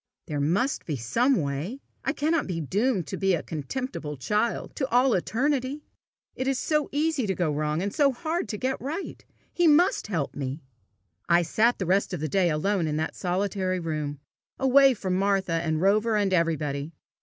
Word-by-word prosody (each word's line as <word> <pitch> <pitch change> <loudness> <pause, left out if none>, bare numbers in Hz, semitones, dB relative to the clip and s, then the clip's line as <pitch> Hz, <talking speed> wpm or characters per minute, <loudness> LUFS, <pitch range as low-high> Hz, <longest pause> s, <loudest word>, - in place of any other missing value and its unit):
There 150 -4 -3
must 185 - 0
be 155 - -1
some 230 - +2
way! 150 - -3 0.2
I - - +1
cannot 310 +2 0
be 175 -3 -3
doomed 195 - 0
to 135 - -5
be 195 -2 +2
a 165 - -4
contemptible 155 - -5
child 210 - -1
to 265 -2 -1
all 250 +1 +4
eternity! 265 - 0 0.5
It 260 - -3
is 270 -1 +1
so 300 +2 0
easy 295 -4 0
to 190 - 0
go 170 -4 0
wrong, 150 +3 -1
and 200 0 -2
so 285 -2 +4
hard 315 0 -3
to 210 - -3
get 260 +4 -2
right! 310 +9 -5 0.3
He 350 -1 +3
must 330 - +4
help 165 -9 -2
me!" 135 +2 -4 0.7
I 170 0 +5
sat 220 +9 +2
the 190 - -2
rest 190 +2 +1
of - - -6
the 155 - -2
day 185 +2 +2
alone 165 +3 0
in 150 0 -1
that 160 +1 -2
solitary 185 0 -1
room, 150 -4 -3 0.4
away 270 0 +5
from 190 -3 -2
Martha 195 -2 +1
and 160 -1 0
Rover 215 +4 +3
and 200 -2 +1
everybody. 155 -3 0
195 Hz, 185 wpm, -26 LUFS, 160-260 Hz, 0.7 s, I